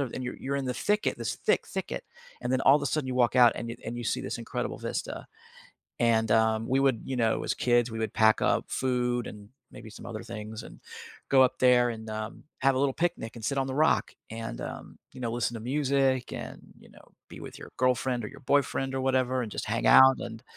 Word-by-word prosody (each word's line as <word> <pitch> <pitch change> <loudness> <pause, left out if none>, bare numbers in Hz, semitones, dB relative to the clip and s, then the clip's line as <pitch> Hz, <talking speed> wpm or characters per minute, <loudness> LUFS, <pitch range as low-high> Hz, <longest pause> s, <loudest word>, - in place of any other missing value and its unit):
of 135 -4 -2
and 130 - -4
you're 125 - -5
you're 140 +1 -3
in 135 - -2
the 125 - -2
thicket, 210 0 0
this 115 -2 -3
thick - - +1
thicket, - - -4 0.4
and 120 - -2
then 130 - +2
all 140 +2 +5
of - - 0
sudden 155 -4 -1
you 130 - -2
walk 125 0 +2
out 120 -2 +7
and 115 - -5
you 115 - -6
and 120 +1 -5
you 120 - -4
see - - -1
this - - -4
incredible - - -4
vista. - - -5 0.7
And, 115 -2 +2
um, 110 0 +2
we 135 +1 +2
would, 135 -4 +2
you 135 - -3
know, 115 -2 +1
as - - 0
kids, 120 -1 +2
we 115 - -5
would 110 - -2
pack 110 -2 +4
up - - +2
food 125 -2 -1
and 105 -1 -11 0.2
maybe 120 -3 -11
some - - -11
other 110 -2 -6
things 110 -1 -7
and - - -12 0.5
go 130 -1 +6
up 130 - 0
there 125 -1 +5
and, 110 -1 -8
um, 110 0 -6 0.2
have 135 0 +4
a 130 - 0
little 135 -1 +1
picnic 165 -10 -2
and 110 -2 -7
sit 140 - -1
on 135 - -1
the 130 - -4
rock 155 +2 +2 0.2
and, 115 +1 -6
um, - - -8 0.2
you 130 - -10
know, 115 -1 -2
listen 120 0 -1
to 115 - -5
music 135 0 0
and, - - -7 0.2
you - - -18
know, - - -19 0.2
be - - -10
with - - -10
your - - -10
girlfriend 125 -2 +1
or - - -5
your 135 +5 -12
boyfriend 135 -1 0
or 130 - -1
whatever 130 -1 +1
and 105 - -7
just - - -4
hang 115 +2 -1
out, 130 0 +8
and 115 -1 -7
125 Hz, 240 wpm, -28 LUFS, 115-130 Hz, 0.7 s, out